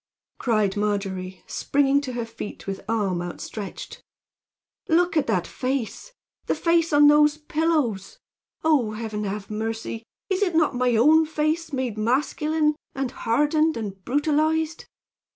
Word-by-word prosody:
cried 215 -5 +1
Margery, 195 -3 -2
springing 280 0 +1
to 260 -3 -5
her 240 -1 -3
feet 225 -2 -8
with 195 -1 -4
arm 200 -6 0
outstretched. 190 +3 -7 0.9
"Look 350 +1 +3
at 310 - +2
that 185 -6 +1
face 260 - -3 0.4
the - - +1
face 335 -1 +2
on 295 0 +6
those 295 0 +5
pillows! 310 - -1 0.5
Oh, 280 -9 +2
Heaven, 215 -1 -4
have 200 +1 -5
mercy! 225 +1 -4 0.2
Is 380 0 -1
it 360 -5 +1
not 315 -3 +3
my 250 -1 +1
own 310 +7 +5
face 315 +2 -1
made 255 -6 -2
masculine, 300 +6 +1 0.2
and 270 -2 -2
hardened 295 +6 +1
and 195 -4 -6
brutalized? 310 - 0
265 Hz, 135 wpm, -24 LUFS, 215-310 Hz, 0.9 s, on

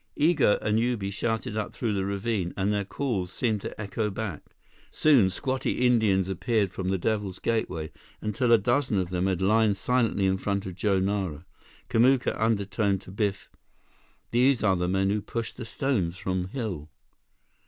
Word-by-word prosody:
Igo 150 -8 +4
and 105 +1 +2
Ubi 115 -5 -1
shouted 110 +1 -2
up 110 -1 -3
through 115 -4 -1
the 95 -1 -1
ravine, 100 -2 -2
and 100 +2 +1
their 100 -1 0
calls 100 -5 -3
seemed 110 -3 -1
to - - -7
echo 105 +1 -2
back. 100 -5 -5 0.5
Soon, 135 -11 +4
squatty 130 +5 -1
Indians 105 -6 +3
appeared 100 +1 0
from 95 0 -3
the 95 - +1
Devil's 100 -1 -2
Gateway 90 -9 -2 0.3
until 110 +3 0
a 115 - +8
dozen 120 +1 +1
of 90 -2 -1
them 90 +1 0
had 95 -1 0
lined 105 0 +3
silently 115 -5 +1
in 95 0 +1
front 100 0 -2
of 95 - -5
Joe 100 +2 +1
Nara. 95 -5 -2 0.4
Kamuka 125 +2 +3
undertoned 100 -2 +1
to 95 - -12
Biff: 100 -1 -2 0.8
"These 125 +1 +3
are 95 -3 +4
the 90 0 -1
men 95 +2 +1
who 105 0 0
pushed 115 +3 -5
stones 110 - -1
from 90 0 -2
hill." 95 - -5
100 Hz, 165 wpm, -27 LUFS, 95-115 Hz, 0.8 s, a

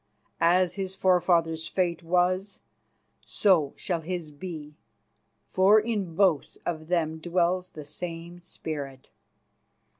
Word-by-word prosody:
As 180 0 +3
his 190 -1 -4
forefather's 170 -3 +2
fate 175 -3 -1
was, 180 +3 0 0.6
so 170 -9 +2
shall 175 -3 -2
his 170 -2 -5
be, 150 -1 -8 0.7
for 195 +3 +5
in 210 -6 -3
both 180 -6 +2
of 155 -2 -3
them 160 -2 0
dwells 180 +2 0
the 150 -2 -10
same 170 +2 -7
spirit. 145 -6 -7
175 Hz, 110 wpm, -27 LUFS, 160-185 Hz, 0.7 s, for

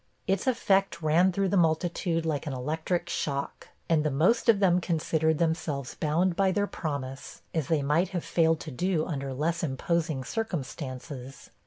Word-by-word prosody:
Its 195 +4 0
effect 195 -8 +2
ran 170 +5 +4
through 195 +1 0
the 200 - +1
multitude, 165 0 +1
like 155 -2 -2
an 145 - -2
electric 160 +7 -2
shock; 140 -4 -3 0.2
and 160 -2 +3
the 155 - +1
most 175 - +2
of 215 -3 +6
them 180 -2 +4
considered 160 -2 +1
themselves 160 -5 -1
bound 170 +4 +1
by 190 +1 +3
their 205 +2 +1
promise, 140 -7 -5
as 160 -5 -1
they 155 -4 +1
might 155 +6 +2
have 180 -4 -4
failed 165 -1 +2
to 155 - -7
do 170 +3 0
under 140 -5 -3
less 160 +5 -1
imposing 155 0 -1
circumstances. 135 - -5
160 Hz, 165 wpm, -28 LUFS, 145-180 Hz, 0.2 s, of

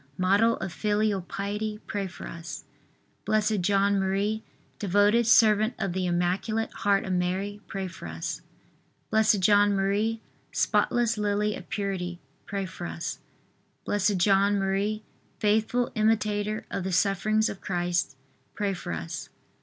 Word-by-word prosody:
model 200 +5 +3
of 190 -3 -5
filial 210 -1 +1
piety, 210 +3 -3
pray 200 -2 -3
for 185 - -10
us. 170 0 -7 0.6
B. - - -2 0.3
J. 190 +3 +1
M., 200 +2 +1 0.4
devoted 205 +4 +3
servant 215 0 +5
of 190 - -2
the 185 0 -1
Immaculate 185 +6 0
Heart 200 -1 +1
of 190 - -2
Mary, 190 +3 -1
pray 195 -1 -4
for 170 - -9
us. 80 0 -4 0.7
B. 220 - +5
J. 210 -2 +4
M., 205 +2 +2 0.3
spotless 235 -2 +1
lily 210 0 +1
of - - -10
purity, 185 -4 -3 0.3
pray 200 -1 -2
for 180 -2 -6
us. 165 - -5 0.7
B. - - 0 0.2
J. 185 +3 +3
M., 200 +1 +2 0.4
faithful 220 +3 +1
imitator 215 -1 +1
of 190 - -2
the 190 - -2
sufferings 210 +4 +2
of 200 - -6
Christ, 175 -5 -1 0.4
pray 200 -1 0
for 180 - -5
us. 80 0 -5
200 Hz, 135 wpm, -27 LUFS, 190-215 Hz, 0.7 s, servant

